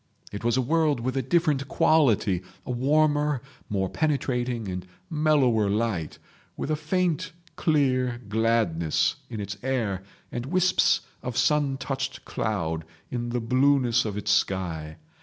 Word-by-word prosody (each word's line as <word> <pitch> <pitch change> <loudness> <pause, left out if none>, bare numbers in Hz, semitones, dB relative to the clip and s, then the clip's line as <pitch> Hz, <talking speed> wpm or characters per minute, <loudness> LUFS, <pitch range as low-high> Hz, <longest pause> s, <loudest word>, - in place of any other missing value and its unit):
It 100 +2 -6
was 120 +1 +2
a 130 - +2
world 155 0 +2
with 130 +2 -2
a 135 - +1
different 145 -1 +1
quality, 115 - +3 0.2
a 125 - -4
warmer, 145 +2 +2 0.3
more 95 -2 0
penetrating 125 - -1
and 90 -1 -4 0.3
mellower 140 -9 +3
light, 105 -7 -1 0.4
with 155 - -3
a - - +3
faint 175 0 -1 0.2
clear 130 -6 +1
gladness 105 -7 +1
in 110 - -5
its 100 -1 -5
air, 115 -8 -1 0.3
and 120 +1 -4
wisps 185 +3 +3 0.2
of 125 -1 -4
sun 140 +1 +2
touched 135 -1 -4
cloud 80 -7 -2 0.3
in 120 -1 -2
the 120 +1 -1
blueness 125 0 +3
of 105 -2 -4
its 105 0 -1
sky. 85 -6 0
125 Hz, 140 wpm, -26 LUFS, 105-145 Hz, 0.4 s, quality